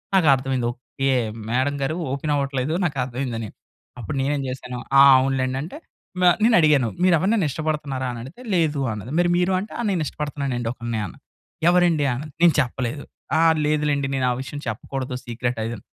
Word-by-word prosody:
నాకు 180 Hz, -5 st, +4 dB
అర్థం 135 Hz, +1 st, -4 dB
అయ్యింది 125 Hz, -2 st, 0 dB
"ఓకే 135 Hz, +2 st, -4 dB, 0.4 s
మేడమ్ 130 Hz, +4 st, +1 dB
గారు 135 Hz, +4 st, -1 dB, 0.2 s
ఓపెన్ 145 Hz, +2 st, -1 dB
అవ్వట్లేదు 140 Hz, +1 st, -1 dB
నాకు 145 Hz, -5 st, -2 dB
అర్థమైందని", 120 Hz, -3 st, -4 dB, 0.5 s
అప్పుడు 115 Hz, +5 st, -5 dB
నేను 140 Hz, +2 st, 0 dB
ఏమి 135 Hz, -, -3 dB
చేశాను, 125 Hz, -1 st, -6 dB, 0.2 s
"ఆ! -, -, +10 dB, 0.2 s
అవునులెండి" 130 Hz, -1 st, 0 dB
అంటే 170 Hz, -, -8 dB, 0.4 s
న -, -, +4 dB, 0.2 s
నేను 230 Hz, +1 st, +5 dB
అడిగాను 145 Hz, -6 st, +4 dB, 0.2 s
"మీరు 185 Hz, -, +5 dB
ఎవరినైనా 195 Hz, 0 st, +2 dB
ఇష్టపడుతున్నారా?" 145 Hz, -3 st, -2 dB
అని 120 Hz, -, -7 dB
అడిగితే 145 Hz, -, -12 dB
"లేదు" 155 Hz, -4 st, +1 dB
అన్నది. 105 Hz, +4 st, -7 dB
మరీ 175 Hz, 0 st, +3 dB
మీరు 180 Hz, +1 st, +1 dB
అంటే 210 Hz, -, -8 dB
"ఆ! -, -, 0 dB
నేను 180 Hz, -4 st, 0 dB
ఇష్టపడుతున్నాను 140 Hz, -3 st, -3 dB
అండి 115 Hz, -1 st, -2 dB
ఒక‌లిని" 120 Hz, -2 st, -4 dB
ఆన‌ను. 95 Hz, -, -10 dB, 0.5 s
"ఎవరండి" 175 Hz, -4 st, +3 dB
అనాది. 145 Hz, +3 st, -7 dB
నేను 170 Hz, -5 st, +6 dB
చెప్పలేదు 130 Hz, +1 st, -3 dB, 0.4 s
"ఆ! -, -, +4 dB, 0.3 s
లేదు 150 Hz, 0 st, +1 dB
లెండి 140 Hz, -1 st, 0 dB
నేను 130 Hz, -, +1 dB
ఆ -, -, +1 dB
విషయం 145 Hz, +2 st, -7 dB
చెప్పకూడదు 130 Hz, +3 st, -4 dB
సీక్రెట్ 120 Hz, 0 st, -3 dB
ఆది" 115 Hz, +1 st, -3 dB
అని. -, -, -16 dB
135 Hz, 190 wpm, -23 LUFS, 125-155 Hz, 0.5 s, ఆ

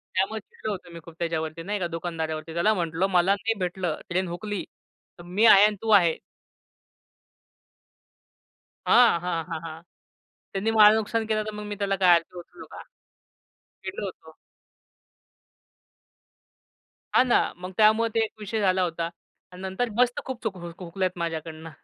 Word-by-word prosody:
त्यामुळे 200 Hz, +4 st, 0 dB
चिडलो 215 Hz, +1 st, -7 dB
होतो 185 Hz, -3 st, -7 dB
मी 170 Hz, -, -8 dB
खूप 165 Hz, -1 st, -13 dB
त्याच्यावरती 165 Hz, -1 st, -3 dB
नाही 205 Hz, +2 st, -3 dB
का 175 Hz, -, -1 dB
दुकानदारावरती, 165 Hz, -1 st, -4 dB
त्याला 190 Hz, +6 st, +2 dB
म्हंटलं 170 Hz, 0 st, -1 dB
मला 185 Hz, +2 st, +4 dB
नाही 220 Hz, +3 st, -1 dB
भेटलं, 180 Hz, -3 st, -2 dB
ट्रेन 185 Hz, +1 st, 0 dB
हुकली 200 Hz, +3 st, -4 dB, 0.6 s
तर -, -, -10 dB
मी 185 Hz, +6 st, +1 dB
आहे 205 Hz, -2 st, +8 dB
आणि 210 Hz, 0 st, +1 dB
तू 225 Hz, -, -4 dB
आहे. 175 Hz, -6 st, +5 dB, 2.7 s
हां, 240 Hz, -8 st, +6 dB
हां, 170 Hz, -2 st, -2 dB
हां, 165 Hz, -2 st, -3 dB
हां, 160 Hz, 0 st, -8 dB, 0.7 s
त्यांनी 200 Hz, +3 st, 0 dB
माझ 215 Hz, -1 st, +7 dB
नुकसान 220 Hz, +1 st, -1 dB
केलं, 215 Hz, -1 st, 0 dB
तर 215 Hz, -, -5 dB
मग 210 Hz, -, -6 dB
मी 205 Hz, 0 st, -5 dB
त्याला 200 Hz, -1 st, 0 dB
काय 185 Hz, -1 st, +4 dB
आरती 170 Hz, +1 st, -3 dB
ओवळू 175 Hz, -, -11 dB
का? -, -, -9 dB, 1.0 s
चिडलो 190 Hz, +2 st, -5 dB
होतो. 160 Hz, -4 st, -10 dB, 2.8 s
हां, -, -, +7 dB
ना, 240 Hz, -, +5 dB, 0.2 s
मग 180 Hz, +1 st, -7 dB
त्यामुळे 220 Hz, +1 st, +4 dB
ते -, -, +3 dB
एक 220 Hz, -, -4 dB
विषय 215 Hz, +1 st, -3 dB
झाला 185 Hz, -2 st, +2 dB
होता 165 Hz, -1 st, -2 dB, 0.4 s
आणि 180 Hz, -, -11 dB
नंतर 190 Hz, +6 st, -2 dB
मस्त 245 Hz, 0 st, +2 dB
खूप 260 Hz, -2 st, -6 dB
चूक 210 Hz, -4 st, -3 dB
हुकल्यात 175 Hz, +2 st, -4 dB
माझ्याकडनं. 165 Hz, -1 st, -5 dB
185 Hz, 155 wpm, -25 LUFS, 170-215 Hz, 2.8 s, आहे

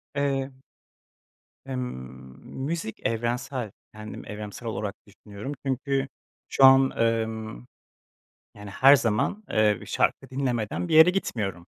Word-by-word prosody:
Eee 140 Hz, -1 st, 0 dB, 1.1 s
Emm, 130 Hz, -1 st, -4 dB, 0.8 s
müzik 155 Hz, -6 st, -3 dB
evrensel, 120 Hz, 0 st, -2 dB, 0.2 s
kendim 105 Hz, 0 st, -9 dB
evrensel 105 Hz, +2 st, -7 dB
olarak 105 Hz, -2 st, -3 dB
düşünüyorum. 105 Hz, +4 st, -9 dB
Çünkü 135 Hz, +1 st, -1 dB, 0.4 s
şu 135 Hz, -, +5 dB
an, 135 Hz, 0 st, +7 dB
emm, 110 Hz, -, -2 dB, 0.9 s
yani, 105 Hz, -1 st, -10 dB
her 135 Hz, +7 st, +7 dB
zaman, 115 Hz, -, -1 dB
eee, 105 Hz, -2 st, +2 dB
şarkı -, -, 0 dB
dinlemeden 130 Hz, +2 st, -2 dB
bir 165 Hz, -, 0 dB
yere 160 Hz, +3 st, +9 dB
gitmiyorum. 105 Hz, -, -2 dB
120 Hz, 110 wpm, -26 LUFS, 105-135 Hz, 1.1 s, yere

